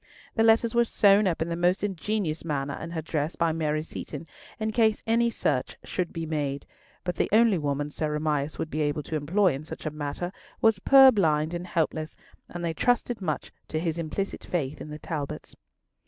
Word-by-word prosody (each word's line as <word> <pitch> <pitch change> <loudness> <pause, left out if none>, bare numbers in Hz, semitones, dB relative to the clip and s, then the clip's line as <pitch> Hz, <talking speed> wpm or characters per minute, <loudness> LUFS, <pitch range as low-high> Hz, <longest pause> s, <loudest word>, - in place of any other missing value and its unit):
The - - +1
letters 225 +1 +4
were 235 0 +5
sewn 205 -2 +4
up 165 -3 0
in 165 - -6
the 170 - -1
most 175 +3 +1
ingenious 195 -3 -2
manner 140 -3 -2
in 165 - -5
her 165 -2 -4
dress 155 +1 -2
by 165 -1 +1
Mary 155 -1 -1
Seaton, 155 -1 -7 0.3
in 220 0 -1
case 220 -1 +2
any 235 +1 +3
search 145 - -1
should 180 -2 -3
be 165 -1 -4
made; 145 -3 -2 0.4
but 180 -1 -2
the - - +1
only 220 -3 +5
woman 145 0 -2
Sir 150 0 -2
Amias 150 -1 -1
would 160 - -4
be 155 - -1
able 150 0 0
to 160 - -4
employ 170 +4 +2
in 135 +3 -5
such 155 - -8
a 155 - -1
matter 150 +4 -4 0.3
was 225 -3 +4
purblind 190 - +6
and 175 +1 -4
helpless, 155 -2 -1 0.3
and 175 0 -5
they 165 - -1
trusted 245 +4 +1
much 155 -5 -3 0.2
to 155 - -2
his 165 0 -2
implicit 170 +5 -3
faith 150 -4 -3
in - - -7
the 150 - -6
Talbots. 150 -2 -5
165 Hz, 200 wpm, -27 LUFS, 150-200 Hz, 0.4 s, purblind